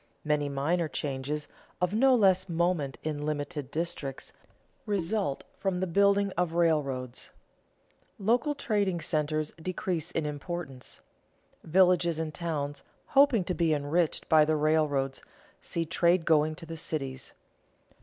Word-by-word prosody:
Many 150 -1 0
minor 155 +5 0
changes, 145 +1 -3 0.3
of 180 +1 0
no 260 +4 +5
less 190 -4 +3
moment 170 -5 0
in 150 -1 -3
limited 145 -2 -3
districts, 150 -4 -4 0.5
result 200 -5 -1 0.2
from 190 -2 -1
the 185 - 0
building 200 +2 +3
of 175 -2 -1
railroads. 140 -7 0 0.9
Local 245 +9 +1
trading 205 -9 0
centers 155 -1 -1
decrease 175 -1 -3
in 165 -3 -2
importance. 150 -2 -6 0.6
Villages 175 -1 +3
and 160 -1 -3
towns, 145 -4 -3 0.3
hoping 270 -7 +5
to 180 - -2
be 165 -3 +2
enriched 150 +3 0
by 155 -2 +6
the 155 +1 +2
railroads, 150 -3 +1 0.4
see 165 -1 -3
trade 170 +1 +2
going 155 -1 +3
to 165 - -9
the 165 0 -7
cities. 135 -5 -4
160 Hz, 125 wpm, -29 LUFS, 150-180 Hz, 0.9 s, by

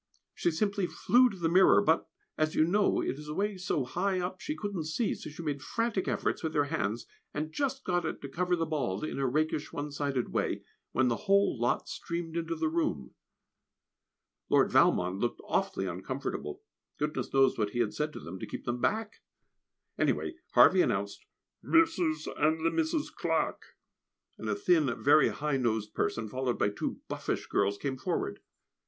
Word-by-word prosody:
She - - +1
simply 200 +3 0
flew 250 +6 +4
to 200 - -8
the 170 -2 0
mirror, 185 +3 +6
but, 165 -6 +2 0.3
as 155 0 0
you 155 - +5
know, 200 +4 +2
it 135 - -2
is 150 - -9
away 200 +7 -1
so 185 -7 -1
high 185 +8 0
up 180 +1 -4
she 305 - -3
couldn't 200 - -4
see, 180 +9 0
so - - -8
she 155 +3 -8
made 145 -3 -2
frantic 205 - -1
efforts - - -1
with 160 -1 -3
her 145 - +4
hands, 105 +4 -1 0.3
and 155 +1 -2
just 275 -1 -1
got 175 -1 0
it 160 - -3
to - - -4
cover 180 +5 0
the 165 -1 -1
bald, 140 -12 -2
in 155 - -3
a 135 - +1
rakish, 155 +3 0
one 145 0 -4
sided 140 -3 -1
way, - - -1 0.3
when 130 0 +2
the 120 - -2
whole 200 0 +4
lot 120 0 0
streamed 170 -1 -5
into 165 0 -2
the 160 0 0
room. 155 - -1 1.4
Lord - - +4
Valmond 90 +2 +3
looked 120 +2 -1
awfully 95 - -1
uncomfortable. 130 - -4 0.3
Goodness 150 -4 -2
knows 135 -1 +4
what 105 -2 +1
he 120 - -4
had 115 -3 +1
said 150 0 -1
to - - -7
them 90 +3 -8
to - - -6
keep - - -7
them 120 0 -2
back! 220 0 0 0.8
Anyway, - - +1 0.2
Harvey - - +7
announced - - -1 0.4
"Mrs. 180 - +2
and 160 +2 +2
the 165 - +3
Misses 320 -2 0
Clarke," - - -2 0.6
and - - -4
a - - +1
thin, 360 -6 +2
very 150 +2 +6
high 150 -2 -1
nosed 110 -4 -1
person, 115 -1 -1
followed 130 +2 -2
by 105 - +2
two 105 - -4
buffish - - -3
girls, 100 0 +1
came 135 +1 -3
forward. - - -2
155 Hz, 185 wpm, -30 LUFS, 130-190 Hz, 1.4 s, Harvey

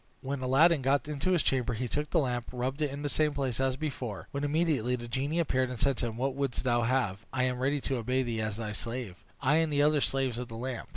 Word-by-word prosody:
When 135 0 -3
Aladdin 145 +6 +5
had - - -7
got 135 0 +2
into 150 +5 0
his 170 - +3
chamber, 125 -3 +1
he 125 +3 -2
took 150 +5 -2
the - - +1
lamp, 125 -5 0
rubbed 130 +4 -3
it 150 - +2
in 140 +2 -6
the - - 0
same 150 0 +1
place 130 -4 -1
as 130 -1 +1
before, 130 -8 -4
when 140 +1 -3
immediately 145 -5 +1
the 120 -1 -7
genie 135 +6 -1
appeared, 130 -6 +1
and 125 -3 -6
said 140 - +2
to 120 - -1
him, 115 -1 -6
"What 135 +2 0
wouldst 135 -2 -2
thou 120 -2 +2
have? 115 -5 0
I 130 -1 0
am 125 -1 0
ready 140 +3 +1
to 135 -1 -1
obey 125 +3 0
thee 115 -3 -2
as 110 -1 -2
thy 110 -2 -4
slave; 115 -3 -5 0.2
I 145 +3 +4
and 160 -1 +2
the 145 0 +3
other 150 -1 +4
slaves 130 -4 0
of 125 - -4
the 115 - -8
lamp." 125 0 -5
130 Hz, 270 wpm, -30 LUFS, 120-145 Hz, 0.2 s, Aladdin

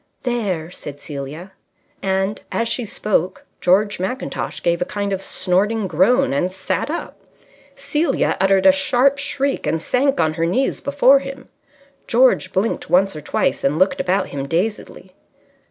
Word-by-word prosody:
"There!" 200 -10 -2
said 145 -4 -9
Celia. 150 +5 -7 0.5
And, 190 +1 -1
as 230 - 0
she 240 +1 -2
spoke, 210 - -1
George 205 +3 +2
Mackintosh 190 +9 -4
gave 170 0 +1
a - - +4
kind 200 +2 -3
of 190 - -3
snorting 200 +4 0
groan 190 - +3
and 175 +6 0
sat 190 +8 -3
up. 330 - -5 0.6
Celia 310 +3 0
uttered 195 0 +3
a 285 - +9
sharp 275 -1 +2
shriek 275 0 -1
and 160 - 0
sank 270 - +1
on 155 -1 +2
her 165 +1 -1
knees 260 +10 0
before 280 -1 +4
him. 275 0 -9 0.6
George 245 -6 +3
blinked 195 +5 -1
once 195 0 +3
or 155 - -6
twice - - -1
and 140 +3 +1
looked 185 +3 +2
about 190 +2 0
him 140 -1 -5
dazedly. 190 +8 -3
195 Hz, 155 wpm, -20 LUFS, 180-255 Hz, 0.6 s, a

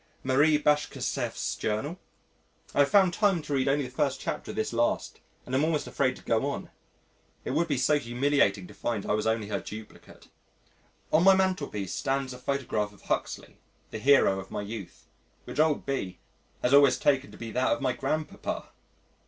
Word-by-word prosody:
_ - - -36 0.2
Marie 145 +4 +4
Bashkirtseff's 150 0 -1
Journal. 140 +12 -2 0.7
I - - -1
have 140 - +5
found 195 -3 +5
time 195 -6 +2
to 145 - -4
read 135 0 +1
only 140 0 +2
the 125 - -8
first 140 -2 0
chapter - - -4
of - - -5
this 110 +2 -2
last 120 0 0 0.3
and 125 - -8
am 135 +3 +3
almost 155 -1 0
afraid 130 -2 0
to - - -15
go 115 +4 +1
on. - - -6 0.7
It - - -2
would 165 +5 +1
be 145 -4 0
so 145 +4 +3
humiliating 120 -6 +1
to - - -13
find 110 -4 -3
I - - -2
was 105 +1 0
only 110 -2 0
her - - -1
duplicate. 110 0 -11 0.8
On 160 +2 +5
my 195 0 +7
mantelpiece 150 - -1
stands 135 -1 -1
a 125 - -10
photograph 125 -6 -1
of 100 - -20
Huxley - - -3 0.3
the 110 - -5
hero 130 -6 +4
of 95 - -9
my - - -4
youth 100 -4 -8 0.4
which - - -7
old 155 -1 +2
B 130 -10 -3 0.5
has 125 - +2
always 140 -1 +6
taken 140 -2 +2
to - - -13
be 115 -1 -7
that 130 +3 +1
of 145 - +1
my 130 -2 0
grandpapa! 155 0 -3
135 Hz, 190 wpm, -28 LUFS, 110-150 Hz, 0.8 s, my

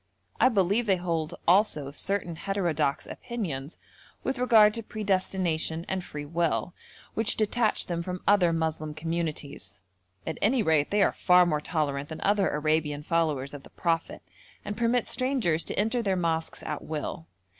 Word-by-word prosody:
I - - +6
believe 205 +1 +1
they 195 - +4
hold 170 -2 -2
also 170 -7 +3
certain 175 +2 -2
heterodox 165 -7 -1
opinions 170 - -5 0.5
with 265 -1 -2
regard 220 -4 +6
to 230 - -4
predestination 185 -6 -1
and 190 -1 -2
free 150 -4 -7
will, 170 +2 -1 0.4
which 225 -1 +1
detach 220 +1 +1
them 170 -1 -2
from 180 +1 -5
other 195 -4 +5
Moslem 160 -2 -2
communities; 155 - -4 0.4
at 160 - -4
any 230 +3 +3
rate 155 -4 +2
they 205 0 +3
are - - +2
far 180 -1 +5
more 155 -3 0
tolerant 145 -4 -2
than 160 - -6
other 200 -1 +2
Arabian 150 -1 0
followers 150 -5 0
of 145 - -7
the - - -15
Prophet, 165 -1 -2 0.4
and 205 0 -4
permit 235 +1 +1
strangers 255 - +1
to - - -4
enter 225 +4 +1
their 195 -4 0
mosques 165 -2 -2
at 150 - -4
will. 150 - -5
170 Hz, 155 wpm, -27 LUFS, 155-205 Hz, 0.5 s, I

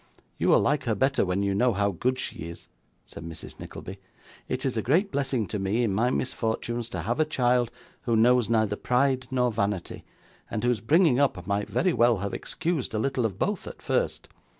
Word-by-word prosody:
'You - - +1
will - - +6
like 145 -2 +1
her 115 -3 +1
better 135 +6 +2
when 95 +1 0
you 100 0 +1
know 120 +4 +3
how 100 +1 +1
good 125 +8 -1
she - - -4
is,' 85 0 -9 0.4
said - - -10
Mrs 80 -1 -9
Nickleby. 95 +2 -8 0.5
'It 130 +2 -2
is 130 - 0
a 110 - 0
great 175 - +2
blessing 135 -5 0
to 105 - -3
me, 100 +5 0
in 105 -4 +1
my 115 +5 +2
misfortunes, 120 -2 -2
to 90 - -4
have 115 - -2
a - - +6
child, 125 -5 +1 0.3
who 120 -3 0
knows 120 +1 +4
neither 110 -3 +2
pride 130 +3 +1
nor 125 -2 +1
vanity, 100 -4 -2 0.5
and 110 - -3
whose 120 -4 +1
bringing 150 +2 +4
up 115 -11 +1
might 100 +2 -1
very 185 -1 +1
well 120 -1 +4
have 100 +1 -4
excused 160 -9 -2
a - - +1
little 125 0 +1
of 95 -4 -9
both 200 - -2
at - - -8
first. - - -1
120 Hz, 205 wpm, -27 LUFS, 105-130 Hz, 0.5 s, will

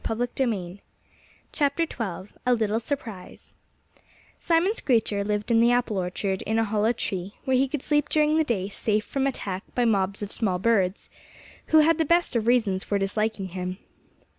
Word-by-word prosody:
XII 225 -5 -2 0.8
A 250 - -1
LITTLE 220 -1 0
SURPRISE 225 -7 -6 0.9
Simon 345 +5 +2
Screecher 225 - +1
lived 210 +2 -2
in 230 0 +5
the 235 +1 +5
apple 245 -5 +1
orchard, 190 +1 -2
in 220 +1 -1
a 225 - +3
hollow 215 +1 +1
tree, 195 -4 -4
where 260 - +2
he 265 +2 +3
could 275 0 -4
sleep 295 -1 +1
during 305 0 +3
the 320 - +4
day 205 -9 -1
safe 210 +1 -1
from 275 -1 -1
attack 195 -8 -3
by 245 - +2
mobs 200 -2 +1
of 205 - -6
small 195 -6 0
birds, 195 -2 +1 0.6
who 315 0 +6
had 325 +1 +3
the 320 - +2
best 340 -3 +2
of 230 -1 0
reasons 220 -6 +2
for 205 - -1
disliking 200 0 -1
him. 185 0 -5
220 Hz, 165 wpm, -25 LUFS, 195-260 Hz, 0.9 s, who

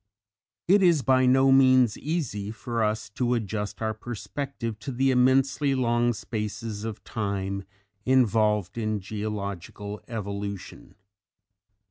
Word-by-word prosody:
It 195 +3 +5
is 170 -7 +4
by 130 +1 +4
no 135 +1 +5
means 130 -4 +5
easy 135 -11 -3
for 115 +1 -2
us 110 0 -1
to 125 +3 0
adjust 110 -1 -3
our 110 0 0
perspective 120 +1 -5
to 135 - -5
the 135 +2 +2
immensely 135 +2 +3
long 120 -1 +2
spaces 105 -1 -5
of 110 -2 -6
time 100 -2 -3 0.4
involved 110 -5 +2
in 110 -1 -1
geological 100 0 -5
evolution. 100 -4 -6
115 Hz, 115 wpm, -26 LUFS, 105-130 Hz, 0.4 s, It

